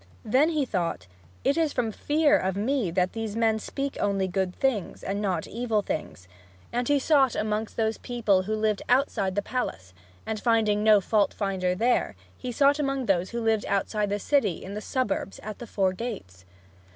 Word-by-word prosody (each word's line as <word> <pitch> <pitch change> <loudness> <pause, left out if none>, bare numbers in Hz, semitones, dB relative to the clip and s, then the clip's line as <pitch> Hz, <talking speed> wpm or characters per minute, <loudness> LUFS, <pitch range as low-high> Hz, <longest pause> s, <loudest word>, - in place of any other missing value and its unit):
Then 270 +8 +4
he 305 -4 0
thought, 180 -8 -2 0.4
"It 280 - +2
is 320 -3 +1
from 235 -3 0
fear 300 +6 +2
of 190 -7 0
me 225 0 0
that 180 +1 0
these 225 -2 -4
men 225 -1 +2
speak 275 +5 -4
only 195 -2 +1
good 185 0 -1
things, 250 -9 -1
and 200 +1 -2
not 185 -5 -1
evil 225 -2 -1
things," 95 - -5 0.5
and 245 0 0
he 290 - +4
sought 275 -3 +3
among 215 +1 -1
those 220 -1 0
people 225 -6 +1
who 215 +3 -2
lived 215 -1 0
outside 245 -7 +2
the 205 - 0
palace. 95 - -4 0.3
And 220 -1 -3
finding 215 -2 +2
no 215 -2 +6
fault 210 +1 +1
finder 185 -3 -1
there, 230 - +1 0.2
he 250 - -5
sought 280 +4 +3
among 275 -3 -1
those 185 -3 +1
who 235 - -3
lived 225 -2 +1
outside 205 +1 0
the 205 - 0
city, 205 - +1
in 195 - -7
the 210 - -4
suburbs, 215 -6 -2
at 215 0 -7
the 240 - -8
four 190 -3 +1
gates. 185 - -7
215 Hz, 190 wpm, -26 LUFS, 195-245 Hz, 0.5 s, no